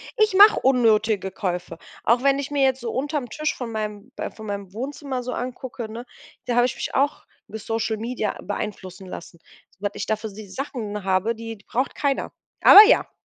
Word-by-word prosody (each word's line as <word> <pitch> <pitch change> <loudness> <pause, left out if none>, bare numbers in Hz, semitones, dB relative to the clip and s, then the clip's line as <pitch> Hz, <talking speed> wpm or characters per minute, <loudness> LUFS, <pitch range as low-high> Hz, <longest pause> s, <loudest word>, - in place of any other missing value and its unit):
ich 430 -2 +3
mache 410 +2 +8
unnötige 220 -6 +2
Käufe. 180 -3 -4 0.3
Auch 240 +3 +3
wenn 275 0 +3
ich 280 - -4
mir 285 -2 +1
jetzt 265 0 +2
so 235 -2 -4
unterm 285 -1 -2
Tisch 305 0 -2
von 240 -3 -6
meinem 210 +2 -5
b - - -4
von 220 - -11
meinem 200 -2 -5
Wohnzimmer 265 +2 -4
so 250 0 -5
angucke, 245 -2 -6
ne, 235 +2 -7 0.4
da 240 - -1
habe 245 0 +5
ich 255 - -2
mich - - -5
auch 280 +2 0 0.2
mit 220 - -7
Social 225 -1 -2
Media 225 -2 -3
beeinflussen 195 -2 -6
lassen. 170 -1 -9 0.4
Was 205 0 -2
ich - - -4
da 220 - +1
für 215 0 -7
sie 205 0 -10
Sachen 215 -4 -5
habe, 190 +4 +1
die 225 -1 -7
braucht 255 +3 -1
keiner. 280 -2 -1 0.3
Aber 420 +1 +11
ja. - - +3
230 Hz, 195 wpm, -23 LUFS, 210-265 Hz, 0.4 s, Aber